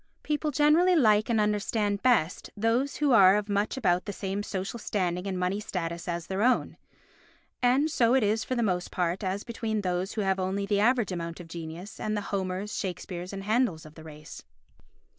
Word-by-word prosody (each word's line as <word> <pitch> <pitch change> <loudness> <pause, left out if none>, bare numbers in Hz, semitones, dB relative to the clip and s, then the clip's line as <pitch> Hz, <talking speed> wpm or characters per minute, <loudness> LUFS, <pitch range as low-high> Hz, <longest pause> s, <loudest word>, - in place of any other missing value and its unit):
People 300 0 -1
generally 305 +5 +4
like 215 -8 +4
and 230 -2 +2
understand 210 -1 0
best 215 -10 +1
those 235 +6 +1
who 295 -2 +1
are 195 -4 +7
of 210 0 -1
much 205 +5 -1
about 180 -7 +1
the - - -4
same 195 0 -3
social 200 +2 -4
standing 180 -3 -2
and 190 -1 -2
money 180 +3 -1
status 170 -5 -4
as 170 -1 -3
their 190 +3 -3
own; 250 +3 +2 0.9
and 255 +4 +3
so 245 -4 +3
it 265 - +3
is 215 +2 +1
for 255 - -3
the 235 - +1
most 180 -4 -1
part 180 +2 -1
as 190 +2 -2
between 225 -2 -3
those 180 0 -2
who 220 - -2
have 190 -1 0
only 190 +2 -1
the 200 0 +1
average 235 -1 +2
amount 170 -1 -5
of 175 - -9
genius 165 +4 -8
and 215 0 -2
the - - -1
Homers, 190 +2 -2
Shakespeares 180 -1 -5
and 195 -1 -6
Handels 215 -7 0
of 155 - -13
the 160 - -13
race. 150 -1 -11
200 Hz, 200 wpm, -28 LUFS, 180-225 Hz, 0.9 s, are